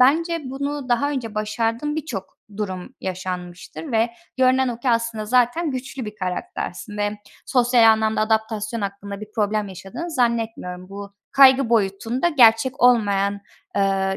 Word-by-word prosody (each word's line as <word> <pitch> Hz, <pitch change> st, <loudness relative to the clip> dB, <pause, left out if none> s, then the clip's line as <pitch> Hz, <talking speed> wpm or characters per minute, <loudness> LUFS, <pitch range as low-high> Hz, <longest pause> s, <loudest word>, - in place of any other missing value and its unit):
bence 330 Hz, +6 st, +3 dB
bunu 280 Hz, +1 st, -4 dB
daha 250 Hz, +4 st, +2 dB
önce 240 Hz, -6 st, -4 dB
başardığın 230 Hz, +7 st, -1 dB
birçok 250 Hz, -12 st, -5 dB, 0.2 s
durum 185 Hz, -4 st, -5 dB
yaşanmıştır 185 Hz, -, -6 dB
ve 225 Hz, +1 st, +2 dB, 0.3 s
görünen 260 Hz, 0 st, +3 dB
o 235 Hz, -2 st, -4 dB
ki 250 Hz, -, +1 dB
aslında 230 Hz, -2 st, -1 dB
zaten 250 Hz, +8 st, +2 dB
güçlü 260 Hz, 0 st, -5 dB
bir 210 Hz, 0 st, -7 dB
karaktersin 210 Hz, -, -5 dB
ve 205 Hz, 0 st, -1 dB, 0.3 s
sosyal 240 Hz, -3 st, +5 dB
anlamda 220 Hz, 0 st, 0 dB
adaptasyon 220 Hz, 0 st, 0 dB
hakkında 200 Hz, 0 st, -5 dB
bir 215 Hz, 0 st, -10 dB
problem 210 Hz, -1 st, 0 dB
yaşadığını 195 Hz, -, -7 dB
zannetmiyorum. 225 Hz, -, -1 dB
Bu 200 Hz, 0 st, -8 dB, 0.2 s
kaygı 270 Hz, -2 st, +6 dB
boyutunda 225 Hz, -, +1 dB
gerçek 255 Hz, -2 st, +4 dB
olmayan, 200 Hz, -5 st, +3 dB, 0.4 s
eee, 195 Hz, -1 st, +1 dB
225 Hz, 135 wpm, -22 LUFS, 200-255 Hz, 0.4 s, kaygı